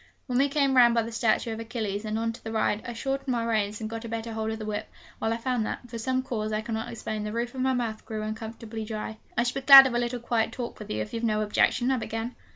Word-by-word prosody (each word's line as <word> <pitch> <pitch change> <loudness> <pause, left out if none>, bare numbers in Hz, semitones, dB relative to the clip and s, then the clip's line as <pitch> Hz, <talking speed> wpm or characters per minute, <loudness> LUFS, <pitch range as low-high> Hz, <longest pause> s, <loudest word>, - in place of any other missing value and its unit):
When 250 -1 0
we 280 +1 +3
came 275 -2 +2
round 240 -2 +7
by 230 - +3
the 230 - -6
statue 225 0 +1
of 220 - -6
Achilles 220 -3 -3
and 215 0 -2
on 230 0 -1
to 235 - -13
the 225 - -5
Ride, 220 -1 +1
I 240 - -4
shortened 270 +4 -3
my 240 -3 0
reins, 215 -2 0
and 220 - -4
got 225 +1 -6
a 230 - -6
better 225 0 -4
hold 220 0 -2
of 220 - -3
the 215 - -6
whip, 215 0 -4 0.3
while 220 - 0
I 230 - 0
found 245 -1 -1
that, 245 - -5
from 230 -1 -6
some 255 +3 0
cause 215 -4 -3
I 215 0 0
cannot 225 +1 -4
explain, 215 -2 -4
the 210 - -3
roof 235 +2 -2
of 260 - -4
my 260 0 +2
mouth 230 -3 -2
grew 215 -1 -5
uncomfortably 220 +1 -6
dry. 215 0 -5 0.2
'I 235 - +4
should 245 +1 -1
be 270 - -3
glad 270 0 +11
of 260 - 0
a 240 - +1
little 240 0 -2
quiet 225 -1 0
talk 240 -2 -5
with 210 - -9
you, 110 0 -1
if - - -12
you've 230 0 -3
no 215 -2 +1
objection,' 240 +4 +2
I 260 - +2
began. 225 +1 -4
230 Hz, 290 wpm, -27 LUFS, 220-245 Hz, 0.3 s, glad